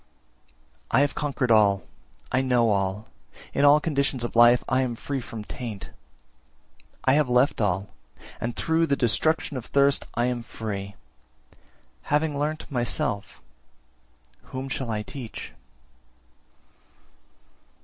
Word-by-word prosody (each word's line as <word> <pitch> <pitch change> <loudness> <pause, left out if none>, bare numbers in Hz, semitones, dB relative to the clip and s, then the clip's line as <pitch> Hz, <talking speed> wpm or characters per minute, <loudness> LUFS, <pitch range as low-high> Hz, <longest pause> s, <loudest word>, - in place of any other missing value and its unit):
353. - - +2
`I - - +6
have 145 0 +1
conquered 135 -4 -1
all, 100 -3 +4 0.5
I 130 - +2
know 120 -4 +3
all, 100 +1 -1 0.5
in 140 - +1
all 145 +1 +7
conditions 140 -5 0
of 120 - -4
life 120 +1 +6
I 130 0 +2
am 125 -2 -1
free 135 +3 -4
from 115 -2 -7
taint; 110 -2 -7 1.1
I 130 - +5
have 145 -3 +3
left 125 +1 +3
all, 100 -1 0 0.5
and 115 +1 -3
through 165 0 +1
the 140 - +2
destruction 140 +4 +1
of 120 - -6
thirst 140 0 +3
I 120 - +2
am 125 -1 -1
free; 100 -3 -6 1.1
having 150 -1 +1
learnt 150 +1 -3
myself, 100 - -2 1.0
whom 130 +1 -6
shall 130 -3 -3
I 105 -1 -2
teach?' 120 -1 -8
125 Hz, 130 wpm, -25 LUFS, 110-140 Hz, 1.1 s, all